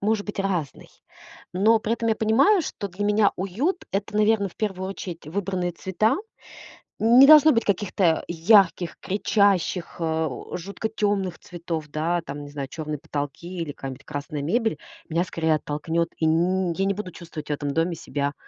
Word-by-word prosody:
может 210 Hz, 0 st, 0 dB
быть 210 Hz, -, -6 dB
разный. 180 Hz, -8 st, -3 dB, 0.6 s
Но 215 Hz, +5 st, +4 dB
при 220 Hz, -, -1 dB
этом 230 Hz, -1 st, -2 dB
я -, -, +3 dB
понимаю, 275 Hz, -, +4 dB
что 200 Hz, -, -5 dB
для 190 Hz, +3 st, -4 dB
меня 210 Hz, 0 st, +3 dB
уют 230 Hz, -, -2 dB
это, 205 Hz, +2 st, -2 dB
наверное, 210 Hz, -1 st, +3 dB
в -, -, -20 dB
первую 190 Hz, -3 st, -3 dB
очередь 175 Hz, -5 st, -7 dB
выбранные 180 Hz, +1 st, -2 dB
цвета. 190 Hz, +5 st, 0 dB, 0.8 s
Не 245 Hz, +5 st, +7 dB
должно 310 Hz, 0 st, +9 dB
быть 230 Hz, -4 st, +2 dB
каких-то 190 Hz, -4 st, +1 dB
ярких, 175 Hz, 0 st, +3 dB
кричащих, 195 Hz, -3 st, +1 dB
а, 160 Hz, -1 st, 0 dB
у 125 Hz, -, -6 dB
жутко 200 Hz, +5 st, -5 dB
тёмных 205 Hz, -4 st, -1 dB
цветов, 165 Hz, -3 st, -5 dB
да? 165 Hz, +4 st, -1 dB
Там 145 Hz, +1 st, -6 dB
не 145 Hz, -, -9 dB
знаю, 140 Hz, -2 st, -5 dB
чёрные 155 Hz, 0 st, -5 dB
потолки 145 Hz, 0 st, -5 dB
или 160 Hz, -3 st, -3 dB
какая-нибудь 135 Hz, -2 st, -8 dB
красная 145 Hz, 0 st, -5 dB
мебель- 220 Hz, -, 0 dB, 0.3 s
меня 165 Hz, +2 st, +1 dB
скорее 160 Hz, -3 st, 0 dB
оттолкнёт, 160 Hz, +3 st, -2 dB
и 160 Hz, -, 0 dB
н 175 Hz, +3 st, +2 dB
я 195 Hz, +3 st, -1 dB
не 200 Hz, -, +1 dB
буду 205 Hz, -3 st, -6 dB
чувствовать 165 Hz, -3 st, -9 dB
в -, -, -1 dB
этом 145 Hz, -1 st, -3 dB
доме 165 Hz, +2 st, 0 dB
себя, 145 Hz, -2 st, -3 dB
180 Hz, 170 wpm, -24 LUFS, 160-210 Hz, 0.8 s, должно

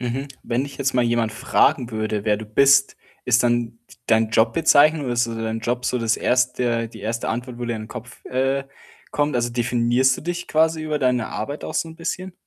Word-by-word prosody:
Mhm. 130 Hz, +3 st, -3 dB
Wenn 125 Hz, +3 st, -1 dB
dich 145 Hz, -, -9 dB
jetzt 135 Hz, -2 st, 0 dB
mal 125 Hz, -, +3 dB
jemand 115 Hz, -2 st, 0 dB
fragen 125 Hz, +2 st, +1 dB
würde, 110 Hz, -1 st, -2 dB
wer 105 Hz, -1 st, +2 dB
du 110 Hz, -, -7 dB
bist, 135 Hz, +5 st, +4 dB, 0.3 s
ist 125 Hz, 0 st, +3 dB
dann 120 Hz, -1 st, +1 dB, 0.2 s
d -, -, -17 dB
deine 110 Hz, -1 st, +3 dB
Jobbezeichnung 145 Hz, +6 st, +4 dB
oder 125 Hz, -, -2 dB
ist 120 Hz, 0 st, +1 dB
dann 115 Hz, -1 st, -5 dB
dein 110 Hz, 0 st, -3 dB
Job 120 Hz, +2 st, -2 dB
so 125 Hz, -, 0 dB
das 115 Hz, -1 st, +1 dB
1. 125 Hz, -2 st, 0 dB
die 110 Hz, -2 st, -12 dB
1. 115 Hz, +3 st, -3 dB
Antwort, 120 Hz, +1 st, -4 dB
wo 120 Hz, -, -4 dB
dir 120 Hz, -1 st, -2 dB
in 110 Hz, -, -6 dB
den 110 Hz, -, -10 dB
Kopf, 125 Hz, -1 st, -10 dB
äh, 135 Hz, +2 st, -1 dB, 0.5 s
kommt? 145 Hz, -2 st, 0 dB
Also, 120 Hz, 0 st, 0 dB
definierst 120 Hz, +2 st, +2 dB
du -, -, -8 dB
dich 175 Hz, +2 st, -4 dB
quasi 160 Hz, 0 st, +2 dB
über 155 Hz, -1 st, -2 dB
deine 125 Hz, -4 st, +1 dB
Arbeit 145 Hz, +1 st, -5 dB
auch -, -, -6 dB
so 165 Hz, -, -1 dB
'n 160 Hz, -, -12 dB
bisschen? 180 Hz, +2 st, -4 dB
125 Hz, 220 wpm, -22 LUFS, 115-140 Hz, 0.5 s, bist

